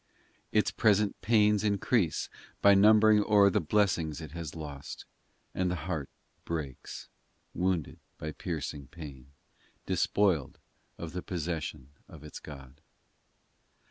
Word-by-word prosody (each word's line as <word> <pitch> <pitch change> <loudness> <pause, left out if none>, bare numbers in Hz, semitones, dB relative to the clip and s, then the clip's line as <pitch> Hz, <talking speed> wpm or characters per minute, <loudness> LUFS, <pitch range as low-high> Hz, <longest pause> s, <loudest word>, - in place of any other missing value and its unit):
in - - 0
Its - - +3
present 105 -1 +2
pains 105 0 +3
increase 100 -2 +1 0.3
By 100 - +7
numbering 105 +1 +6
o 105 - 0
er 100 - +7
the - - +2
blessings 85 -4 +1
it 80 -3 -8
has 85 -2 -6
lost 75 -3 -8 0.5
And 90 -1 0
the 90 - -1
heart 80 -6 -3 0.3
breaks, 75 -6 -5 0.5
Wounded 90 -3 -1 0.2
by 75 - -5
piercing 75 -4 -5
pain, 70 -5 -10 0.6
Despoiled 95 -9 +1 0.4
of 85 -2 -6
the 90 - -3
possession 80 -6 -4 0.2
of 75 -2 -13
its 75 - -9
God. 70 -1 -12
85 Hz, 125 wpm, -30 LUFS, 75-100 Hz, 0.6 s, By